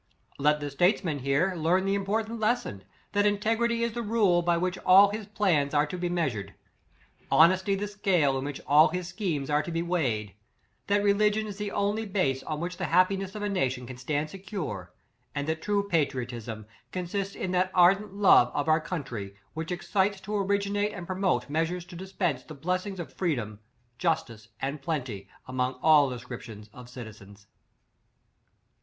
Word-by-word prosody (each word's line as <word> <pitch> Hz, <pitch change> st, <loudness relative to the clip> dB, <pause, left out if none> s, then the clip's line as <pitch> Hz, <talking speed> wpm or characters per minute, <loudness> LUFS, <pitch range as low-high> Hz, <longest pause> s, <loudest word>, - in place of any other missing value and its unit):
" -, -, -44 dB
Let 150 Hz, +1 st, +3 dB
the 145 Hz, -1 st, -4 dB
statesman 175 Hz, 0 st, +1 dB
here 140 Hz, +8 st, +1 dB
learn 175 Hz, +3 st, +1 dB
the 195 Hz, -, +1 dB
im 200 Hz, -1 st, -1 dB
portant 220 Hz, +3 st, -1 dB
lesson, 215 Hz, -, -1 dB, 0.3 s
that 205 Hz, 0 st, +3 dB
integrity 225 Hz, +3 st, +1 dB
is 235 Hz, -1 st, -1 dB
the 240 Hz, -, -3 dB
rule, 205 Hz, -6 st, +3 dB
by 170 Hz, 0 st, +2 dB
which 180 Hz, +2 st, -1 dB
all 195 Hz, +2 st, +7 dB
his 210 Hz, -1 st, -5 dB
plans 170 Hz, -9 st, +1 dB
are 145 Hz, +1 st, +4 dB
to 150 Hz, -, -6 dB
be 175 Hz, -1 st, -2 dB
measured; 125 Hz, -, -2 dB, 0.7 s
honesty 185 Hz, +3 st, +5 dB
the 205 Hz, +1 st, -3 dB
scale 185 Hz, -9 st, +1 dB
in -, -, -4 dB
which 145 Hz, -1 st, -5 dB
all 150 Hz, +3 st, +6 dB
his 180 Hz, -1 st, -4 dB
schemes 165 Hz, -10 st, -2 dB
are 150 Hz, 0 st, +3 dB
to 160 Hz, -, -6 dB
be 165 Hz, 0 st, -1 dB
weighed; 125 Hz, -, -1 dB, 0.5 s
that 205 Hz, 0 st, +2 dB
religion 210 Hz, +1 st, +2 dB
is 205 Hz, -2 st, -7 dB
the 205 Hz, 0 st, -2 dB
on 200 Hz, +1 st, 0 dB
ly 225 Hz, -, -3 dB
base 180 Hz, -10 st, 0 dB
on 155 Hz, +1 st, -4 dB
which 180 Hz, +2 st, -4 dB
the 185 Hz, -, -2 dB
happiness 185 Hz, +4 st, +2 dB
of 210 Hz, -, -4 dB
a -, -, 0 dB
na 185 Hz, -10 st, +1 dB
tion 125 Hz, -1 st, -6 dB
can 125 Hz, 0 st, -9 dB
stand 145 Hz, +4 st, -2 dB
secure, 190 Hz, -3 st, -6 dB, 0.4 s
and 145 Hz, +1 st, -2 dB
that 160 Hz, 0 st, -2 dB
true 200 Hz, +1 st, 0 dB
pa 175 Hz, -4 st, +2 dB
triotism 120 Hz, -6 st, -3 dB, 0.3 s
consists 190 Hz, +2 st, -3 dB
in 185 Hz, -, -3 dB
that 185 Hz, 0 st, +2 dB
ardent 195 Hz, +3 st, +4 dB
love 190 Hz, -11 st, +6 dB
of 145 Hz, -, -1 dB
our 155 Hz, 0 st, +4 dB
country, 120 Hz, -, -5 dB, 0.2 s
which 160 Hz, +2 st, -5 dB
excites 190 Hz, +2 st, 0 dB
to 210 Hz, +2 st, -5 dB
originate 200 Hz, +1 st, 0 dB
and 180 Hz, -3 st, -7 dB
promote 190 Hz, +1 st, 0 dB
measures 165 Hz, +4 st, -1 dB
to 180 Hz, 0 st, -12 dB
dispense 180 Hz, -6 st, -2 dB
the 155 Hz, -, -11 dB
bless 180 Hz, +7 st, -2 dB
ings 195 Hz, -2 st, -6 dB
of 170 Hz, -, -7 dB
freedom, 120 Hz, -, -2 dB, 0.4 s
justice, 115 Hz, -2 st, -1 dB
and 140 Hz, +2 st, -3 dB
plenty, 130 Hz, -, -4 dB, 0.2 s
among 130 Hz, 0 st, -1 dB
all 150 Hz, -3 st, +6 dB
descriptions 115 Hz, -4 st, -8 dB
of 125 Hz, -1 st, -12 dB
citizens. 105 Hz, -4 st, -11 dB
175 Hz, 185 wpm, -28 LUFS, 140-200 Hz, 0.7 s, all